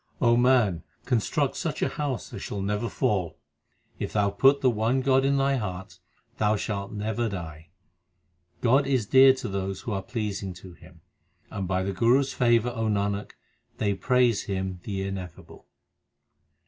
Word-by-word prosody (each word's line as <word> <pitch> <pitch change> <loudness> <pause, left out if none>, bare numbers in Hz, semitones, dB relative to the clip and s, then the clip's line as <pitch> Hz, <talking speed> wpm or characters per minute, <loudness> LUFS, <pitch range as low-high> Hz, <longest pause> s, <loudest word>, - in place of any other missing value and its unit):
O 120 -1 +4
man, 120 -8 +3 0.2
construct 115 -4 0
such - - -3
a - - +2
house 140 -5 -4
as - - -6
shall 100 -1 -4
never 105 +3 -1
fall. 100 -10 -1 0.6
If - - -4
thou 100 -1 +2
put 135 +7 +4
the 130 - +4
one 115 +4 +1
God 135 0 +3
in 140 +1 +2
thy 135 0 +2
heart, 95 -4 -6 0.4
thou 105 0 +3
shalt 100 -1 -4
never 110 +2 -2
die. 80 -5 -7 0.9
God 135 +3 +3
is 130 -5 +1
dear 135 +4 +7
to 130 -2 -6
those 95 -1 -3
who 120 - -5
are 100 -1 -2
pleasing 100 -3 -4
to 90 0 -12
Him; 85 -1 -18 0.5
And 95 -2 -4
by 95 0 0
the 100 +1 -2
Guru 120 +8 +4
s 140 - -4
favour, 120 -1 +3
O 115 -2 -2
Nanak, 100 -1 -1 0.4
they 100 -2 0
praise 125 +1 +2
Him 95 -2 -3
the 95 -2 -3
Ineffable. 95 -3 -8
105 Hz, 165 wpm, -26 LUFS, 95-125 Hz, 0.9 s, dear